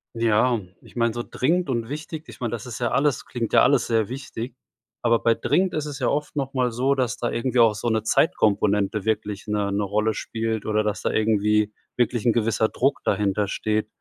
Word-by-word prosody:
Ja, 115 +1 +2 0.2
ich - - -18
meine, 115 -1 +1
so 120 +1 -3
dringend 170 +4 0
und 115 -3 -1
wichtig 150 +3 -6
ich - - -12
meine, 120 -3 -2
das 120 0 -5
ist 120 -3 -7
ja 120 -1 0
alles 140 -1 +1
klingt 115 -2 -4
ja - - +7
alles 140 -4 +4
sehr 115 -2 +1
wichtig, 125 -2 -6 0.5
aber 115 -1 +3
bei 115 -1 +3
dringend 175 +11 +1
ist 155 -1 -1
es 145 -2 -6
ja 125 - 0
oft 150 +1 -1
noch 135 -2 -2
mal 125 -2 +1
so, 130 +4 +1
dass 125 -2 -1
da 120 - -1
irgendwie 125 +1 -1
auch 115 -2 +5
so 110 +3 -4
'ne 110 -1 +1
Zeitkomponente 105 - +2
wirklich 105 -2 -2
'ne 105 -2 -1
'ne 100 +1 0
Rolle 105 +2 0
spielt 110 -1 -3
oder 110 0 +1
dass 105 -1 -2
da - - +1
irgendwie 105 -1 +2 0.2
wirklich 120 -2 0
'n 120 - +4
gewisser 110 -1 +1
Druck 135 +3 0
dahintersteht. 105 +2 0
115 Hz, 210 wpm, -24 LUFS, 105-130 Hz, 0.5 s, ja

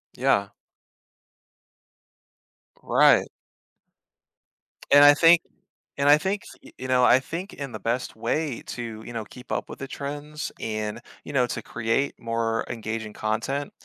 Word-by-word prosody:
Yeah. 100 0 +2 2.3
Right. - - +4 1.6
And 145 +1 +9
I 145 0 +9
think 165 +2 +6 0.6
and 140 - +1
I 145 - +8
think, 195 +4 -2
s - - -13
y - - -14
you 130 - -6
know, 125 -1 +3
I 125 - +6
think 170 +8 -6
in 140 -3 -6
the - - -5
best 120 +2 -2
way 120 +4 -2
to, 115 -2 -6
you 120 - -8
know, 115 -2 -4
keep 125 +4 -13
up - - -2
with - - -8
the 135 - -5
trends, 145 +3 -5
and, 110 0 -3 0.3
you 145 - -7
know, 125 -3 +3
to - - -4
create 115 +5 -1
more 115 -1 -1
engaging 110 -1 -4
content 115 +8 -2
125 Hz, 145 wpm, -25 LUFS, 115-145 Hz, 2.3 s, And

